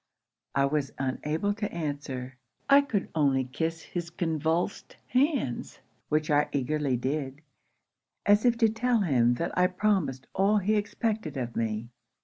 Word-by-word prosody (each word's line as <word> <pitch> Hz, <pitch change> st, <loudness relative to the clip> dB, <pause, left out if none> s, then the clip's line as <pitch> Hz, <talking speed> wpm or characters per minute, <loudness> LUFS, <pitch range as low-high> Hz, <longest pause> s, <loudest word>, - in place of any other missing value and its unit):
'I 140 Hz, -, +4 dB
was 140 Hz, -1 st, -1 dB
unable 150 Hz, +8 st, -1 dB
to 210 Hz, -1 st, -3 dB
answer. 140 Hz, -5 st, -4 dB, 0.3 s
I 280 Hz, +1 st, +7 dB
could 220 Hz, -8 st, -2 dB
only 140 Hz, -4 st, +2 dB
kiss 165 Hz, +6 st, -3 dB
his 170 Hz, -2 st, -5 dB
convulsed 165 Hz, +2 st, -1 dB
hands; 255 Hz, -, 0 dB, 0.3 s
which 155 Hz, 0 st, +1 dB
I 145 Hz, 0 st, +3 dB
eagerly 140 Hz, -1 st, 0 dB
did, 135 Hz, +2 st, -3 dB, 0.8 s
as 205 Hz, +1 st, +5 dB
if 240 Hz, -2 st, +3 dB
to 230 Hz, -1 st, +5 dB
tell 230 Hz, +1 st, +1 dB
him 125 Hz, -9 st, +3 dB
that 170 Hz, -, -3 dB
I 180 Hz, 0 st, +4 dB
promised 180 Hz, -9 st, 0 dB
all 200 Hz, +3 st, +3 dB
he 205 Hz, +2 st, +1 dB
expected 210 Hz, -6 st, -2 dB
of 120 Hz, -2 st, -4 dB
me. 115 Hz, 0 st, -2 dB
160 Hz, 140 wpm, -28 LUFS, 135-205 Hz, 0.8 s, I